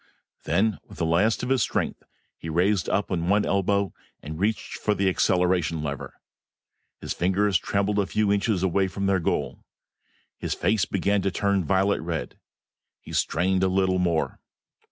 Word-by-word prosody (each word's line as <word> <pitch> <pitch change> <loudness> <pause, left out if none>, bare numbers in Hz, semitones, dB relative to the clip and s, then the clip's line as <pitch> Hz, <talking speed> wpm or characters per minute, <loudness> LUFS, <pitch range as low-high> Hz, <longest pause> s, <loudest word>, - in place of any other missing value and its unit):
Then, 100 +5 +1
with - - -14
the 85 - 0
last 90 +10 +2
of 125 - -2
his 135 -2 +2
strength, - - -1 0.3
he 80 - -8
raised 90 +4 +1
up 100 0 0
on 85 -1 -1
one 105 +1 +3
elbow 100 0 +1 0.3
and 75 +2 -6
reached 110 +3 -1
for 105 - +1
the 100 -1 +1
acceleration 90 -4 +1
lever. 70 -2 -5 0.9
His - - -3
fingers 95 +1 +2
trembled 100 +2 0
a 100 - +1
few 105 -1 +1
inches 100 -2 0
away 95 +1 +2
from 100 +1 -4
their 95 -1 +2
goal. 85 - -2 0.8
His - - -2
face 110 -2 +1
began 100 +1 0
to 95 - +1
turn 100 0 0
violent 95 +5 +1
red. 85 -1 -4 0.6
He - - -11
strained 95 +3 +1
a 95 - +3
little 95 0 +1
more. 85 -3 0
95 Hz, 165 wpm, -25 LUFS, 90-100 Hz, 0.9 s, one